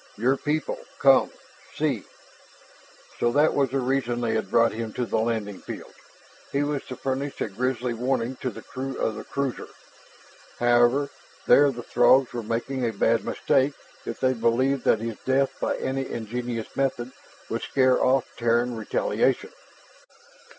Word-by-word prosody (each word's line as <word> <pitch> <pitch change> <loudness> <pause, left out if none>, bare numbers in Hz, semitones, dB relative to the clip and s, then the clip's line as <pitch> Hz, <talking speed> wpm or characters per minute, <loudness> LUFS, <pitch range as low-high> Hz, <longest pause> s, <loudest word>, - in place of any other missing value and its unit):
"Your 125 +5 +2
people 150 +2 -2 0.2
come - - +5 0.5
see - - -1 0.5
" - - -25
So 120 - +2
that 150 +3 +4
was 140 -2 +2
the 135 - -1
reason 130 -2 0
they 115 -2 0
had 110 - -1
brought 115 0 +4
him 110 -1 -5
to 125 - -1
the 110 - 0
landing 110 -3 -2
field. - - -8 0.6
He 140 +1 +1
was 145 -1 -2
to 130 - -6
furnish 135 +2 -3
a - - -1
grisly 125 +3 -1
warning 125 +1 -1
to 130 - -3
the - - -10
crew 135 +1 -5
of 110 - 0
the - - -7
cruiser. 140 -3 -3 0.9
However, 120 +4 +3 0.3
there 145 0 +6
the 120 -2 -8
Throgs 130 +2 +4
were 120 - -3
making 120 +4 -3
a 115 - +1
bad 115 +2 +2
mistake 140 +1 +1 0.3
if - - -6
they 130 0 +2
believed 130 +3 +1
that 110 - +3
his 115 -1 -4
death 135 +1 +2
by - - -1
any 135 0 -2
ingenious 120 0 -4
method 130 -2 -1 0.4
could - - -3
scare 130 -2 +2
off 130 0 +3
Terran 120 +1 +1
retaliation. 110 -1 0
125 Hz, 160 wpm, -25 LUFS, 115-135 Hz, 0.9 s, there